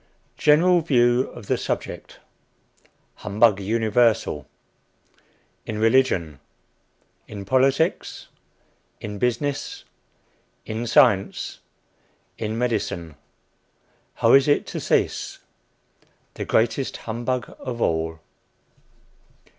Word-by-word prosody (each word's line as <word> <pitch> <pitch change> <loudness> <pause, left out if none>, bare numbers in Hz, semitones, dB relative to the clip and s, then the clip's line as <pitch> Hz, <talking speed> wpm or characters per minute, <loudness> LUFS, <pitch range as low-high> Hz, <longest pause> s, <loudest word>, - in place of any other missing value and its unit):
GENERAL 170 +4 +4
VIEW 125 -4 +2
OF 120 - -11
THE - - 0
SUBJECT. - - -5 1.0
HUMBUG 105 0 +2
UNIVERSAL. 110 - +1 1.2
IN 110 - -4
RELIGION. 110 - +2 0.9
IN 100 -2 -8
POLITICS. 135 - +1 0.7
IN 105 -1 -7
BUSINESS. 140 +5 -2 0.8
IN 110 +2 -4
SCIENCE. 105 -5 +2 0.8
IN 110 0 -3
MEDICINE. 105 -9 -2 1.0
HOW - - +3
IS 135 +1 +6
IT 145 - +2
TO - - -5
CEASE. - - -1 1.0
THE - - -5
GREATEST 120 +4 0
HUMBUG 120 +1 -3
OF 120 -2 -6
ALL. 80 -4 -1
115 Hz, 85 wpm, -23 LUFS, 105-130 Hz, 1.2 s, IS